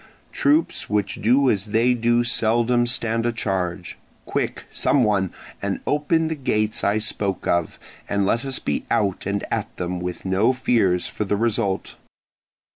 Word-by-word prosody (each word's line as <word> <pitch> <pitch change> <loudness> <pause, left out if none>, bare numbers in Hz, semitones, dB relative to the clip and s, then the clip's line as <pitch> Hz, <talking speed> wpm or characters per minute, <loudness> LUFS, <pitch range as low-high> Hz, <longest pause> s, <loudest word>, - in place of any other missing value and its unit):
Troops 150 +4 +1
which 105 -1 -1
do 130 +6 +4
as 100 -2 -1
they 115 +4 +3
do 120 0 +2
seldom 120 +1 +2
stand 115 -1 0
a - - +2
charge. 95 -5 -3 0.3
Quick, - - -2
someone, 105 -8 +2 0.3
and 100 -1 -2
open 160 +2 +1
the 160 - -1
gates 110 -7 -1
I 100 +2 +2
spoke 105 -3 -2
of, 85 -2 0 0.3
and 100 -1 +1
let 115 +4 +1
us 135 -1 -3
be 75 - -2
out 100 -2 0
and 100 0 -1
at - - -3
them 90 0 -3
with 90 +1 -5
no 100 +7 +3
fears 105 -8 +1
for - - -3
the 100 +1 0
result." 105 -3 -1
110 Hz, 155 wpm, -23 LUFS, 95-120 Hz, 0.3 s, do